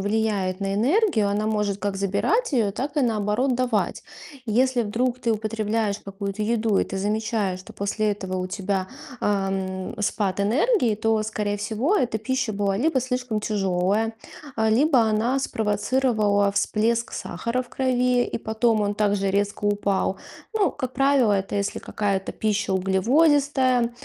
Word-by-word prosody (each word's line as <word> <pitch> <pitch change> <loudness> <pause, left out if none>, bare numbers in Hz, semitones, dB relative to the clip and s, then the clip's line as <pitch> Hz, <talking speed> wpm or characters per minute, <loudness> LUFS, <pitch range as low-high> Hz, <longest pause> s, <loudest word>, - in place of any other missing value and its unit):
влияет 205 -2 0
на 195 0 -1
энергию. 255 - +2
Она 210 +1 0
может 210 -2 0
как 205 -1 -2
забирать 200 - 0
её, 220 -6 +2
так 275 +8 -4
и, 290 - +3
наоборот, 225 +3 +1
давать. 245 -3 -1 0.4
Если 245 +3 +2
вдруг 240 +4 -1
ты 235 - 0
употребляешь 215 -1 -1
какую-то 200 +1 -5
еду 220 -2 +1
и - - +2
ты 195 - -6
замечаешь, 210 -1 -1
что 185 - -13
после 210 +1 0
этого 190 -2 -4
у 185 - -2
тебя, 190 0 -2 0.3
э, - - -1
м, 195 -2 -2
спад 200 -2 -1
энергии, 245 - +2
то, 220 0 +1
скорее 210 -1 -2
всего, 225 - 0
эта 245 - 0
пища 260 0 -1
была 200 -1 0
либо 300 +3 +2
слишком 250 -3 -2
тяжёлая, 200 +1 0 0.4
либо 240 +6 +3
она 225 +4 +1
спровоцировала 210 -3 +1
всплеск 225 +3 0
сахара 235 +8 -3
в 245 - -18
крови, 250 -1 +1
и - - 0
потом 220 0 +1
он 205 0 0
также 205 -2 +1
резко 205 +1 -1
упал. 200 -2 0 0.4
Ну, 400 -7 +2
как 255 -3 -5
правило, 270 -4 +3
это 195 0 -1
если 200 0 -2
какая-то 195 -2 -2
пища 210 -2 -1
углеводистая, 255 - +2
215 Hz, 150 wpm, -24 LUFS, 200-245 Hz, 0.4 s, и